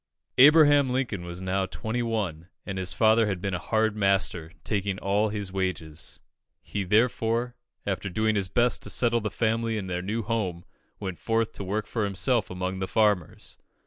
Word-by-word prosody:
Abraham 145 -1 +7
Lincoln 125 -8 -2
was 85 +1 -7
now 95 +1 0
twenty 110 +5 -3
one, 100 -9 -2 0.2
and 95 -2 -4
his 90 -1 -2
father 110 0 +4
had 95 -3 -2
been 95 +1 -3
a 90 - -1
hard 110 +2 0
master, 95 -5 +1
taking 100 -2 -1
all 100 +3 +1
his 100 -3 -4
wages. 85 -5 -3 0.4
He 100 - -3
therefore, 115 +3 +1 0.3
after 100 - -2
doing 110 +4 +1
his 100 -3 0
best 120 +6 +2
to - - -3
settle 120 -1 +1
the 105 - -2
family 115 +1 0
in 100 - -4
their 90 -1 -3
new 110 +5 -2
home, 95 -7 -2 0.3
went 95 -4 -5
forth 115 -1 0
to - - -7
work 105 +3 -2
for 110 -1 -2
himself 105 +3 +1
among 90 +1 -3
the 95 - -2
farmers. 105 -7 0
105 Hz, 175 wpm, -27 LUFS, 95-115 Hz, 0.4 s, Abraham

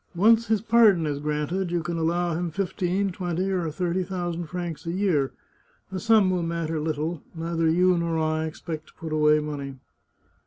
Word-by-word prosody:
Once 225 +5 +4
his 220 -2 +2
pardon 220 -7 +5
is 145 -2 -2
granted, 150 +5 -1
you 170 -1 -1
can 170 +2 -3
allow 170 +1 0
him 175 +1 -2
fifteen, 190 +2 -1
twenty, 180 +1 -2
or 180 -4 0
thirty 180 +3 -1
thou 180 -2 -3
sand 170 -1 -5
francs 170 -3 -5
a - - 0
year; 175 -8 +1 0.6
the 190 - -3
sum 215 -3 +4
will 180 -1 0
matter 165 -1 -2
little; 155 +1 -2
neither 165 0 0
you 180 +2 +4
nor 170 -1 0
I 155 0 0
expect 155 0 -6
to - - -19
put 160 -1 -6
away 150 0 +4
money." 145 -2 -5
170 Hz, 185 wpm, -25 LUFS, 155-185 Hz, 0.6 s, pardon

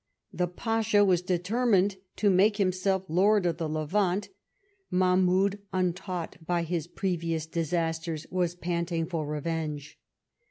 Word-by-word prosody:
The 180 - 0
Pasha 215 +2 +2
was 180 -3 +3
determined 195 +2 +1 0.2
to 205 -2 +3
make 200 +3 +4
himself 190 -1 +1
Lord 195 +4 +3
of 170 -2 0
the 165 -2 -2
Levant: 185 +6 0 0.6
Mahmoudy 185 +2 +3
untaught 180 -1 -2
by 175 +1 0
his 165 -1 -2
previous 170 -4 -2
disasters, 165 0 -2
was 175 -1 0
panting 170 -1 -2
for 160 -3 -3
revenge. 150 -1 -4
180 Hz, 120 wpm, -28 LUFS, 165-190 Hz, 0.6 s, make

